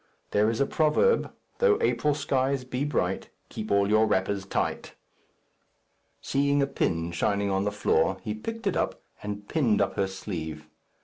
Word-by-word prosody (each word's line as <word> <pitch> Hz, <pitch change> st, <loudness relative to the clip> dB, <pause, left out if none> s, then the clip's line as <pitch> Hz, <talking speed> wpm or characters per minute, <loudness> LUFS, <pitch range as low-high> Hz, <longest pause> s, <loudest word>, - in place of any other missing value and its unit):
There 105 Hz, +1 st, +3 dB
is 115 Hz, -, -2 dB
a 140 Hz, -, +4 dB
proverb, 155 Hz, -, +2 dB, 0.3 s
"'Though 465 Hz, -3 st, +4 dB
April 150 Hz, -, +1 dB
skies 135 Hz, -2 st, 0 dB
be 130 Hz, +2 st, -2 dB
bright, 95 Hz, -10 st, -1 dB, 0.2 s
Keep 110 Hz, -, -6 dB
all 100 Hz, 0 st, +3 dB
your 110 Hz, +1 st, +4 dB
wrappers 95 Hz, 0 st, 0 dB
tight.'" -, -, -2 dB, 1.3 s
Seeing 140 Hz, +1 st, +1 dB
a 140 Hz, -, +3 dB
pin 85 Hz, -11 st, -1 dB
shining 100 Hz, +4 st, 0 dB
on 95 Hz, +1 st, 0 dB
the 105 Hz, -, 0 dB
floor, 95 Hz, -3 st, +1 dB
he 105 Hz, -3 st, -2 dB
picked 225 Hz, -, -6 dB
it 195 Hz, -, +1 dB
up -, -, -2 dB, 0.2 s
and 105 Hz, 0 st, -6 dB
pinned 125 Hz, -10 st, +2 dB
up -, -, +1 dB
her 100 Hz, -, +2 dB
sleeve. 80 Hz, -6 st, -6 dB
105 Hz, 165 wpm, -27 LUFS, 95-140 Hz, 1.3 s, a